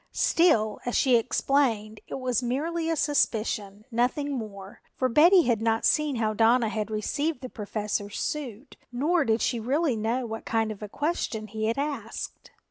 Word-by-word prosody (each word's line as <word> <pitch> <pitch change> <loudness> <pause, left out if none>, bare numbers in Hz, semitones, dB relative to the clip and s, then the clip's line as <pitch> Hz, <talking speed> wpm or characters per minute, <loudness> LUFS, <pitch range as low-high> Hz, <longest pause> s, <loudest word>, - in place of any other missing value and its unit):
Still 225 -12 +3
as 245 - -2
she 260 -3 +4
explained 230 -3 +1
it - - -5
was 255 -2 0
merely 320 +7 -1
a 325 - +1
suspicion, 215 -8 0
nothing 250 +5 0
more, 205 -6 -7
for 255 - +1
Betty 335 +9 +6
had 235 -5 +1
not 225 0 +1
seen 300 -2 +2
how 220 -2 0
Donna 230 +1 +3
had 215 -1 -3
received 285 +7 -2
the 255 - -6
Professor's 210 -2 -4
suit 270 -4 -5
nor 305 +7 +1
did 225 -1 +1
she 240 - 0
really 270 +4 +1
know 230 +4 -1
what 225 0 -6
kind 225 -1 0
of 210 - -9
a 210 - -6
question 290 - -2
he 215 +1 -4
had 230 - 0
asked. 275 -6 -5
235 Hz, 170 wpm, -27 LUFS, 215-285 Hz, -, Betty